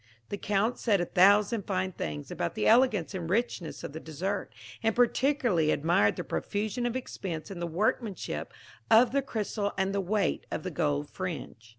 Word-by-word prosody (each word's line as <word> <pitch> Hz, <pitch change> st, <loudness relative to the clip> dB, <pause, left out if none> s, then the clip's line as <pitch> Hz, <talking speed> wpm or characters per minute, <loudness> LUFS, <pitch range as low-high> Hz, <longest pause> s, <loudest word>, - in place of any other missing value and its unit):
The 205 Hz, -, -3 dB
Count 210 Hz, +4 st, 0 dB
said 210 Hz, -5 st, +2 dB
a 175 Hz, -, 0 dB
thousand 205 Hz, +4 st, +4 dB
fine 185 Hz, -1 st, 0 dB
things 75 Hz, -, -5 dB
about 85 Hz, -, -3 dB
the -, -, -1 dB
elegance 225 Hz, -7 st, +4 dB
and 170 Hz, -3 st, -4 dB
richness 195 Hz, -6 st, -1 dB
of -, -, -6 dB
the 160 Hz, -, -5 dB
dessert, 180 Hz, +6 st, -3 dB, 0.3 s
and 225 Hz, -1 st, +1 dB
particularly 245 Hz, -, +2 dB
admired 155 Hz, -9 st, +3 dB
the -, -, -4 dB
profusion 220 Hz, +4 st, -2 dB
of 240 Hz, -, -3 dB
expense 190 Hz, -10 st, -5 dB
in 185 Hz, -, -6 dB
the 170 Hz, -, -2 dB
workmanship 205 Hz, +4 st, -2 dB, 0.4 s
of 230 Hz, +1 st, +6 dB
the 275 Hz, +1 st, +2 dB
crystal 210 Hz, -4 st, -2 dB
and 190 Hz, 0 st, 0 dB
the 200 Hz, -, +1 dB
weight 195 Hz, -1 st, 0 dB
of -, -, -4 dB
the 185 Hz, -, -4 dB
gold 145 Hz, -1 st, 0 dB
fringe. 160 Hz, -10 st, -6 dB
195 Hz, 180 wpm, -29 LUFS, 170-220 Hz, 0.4 s, of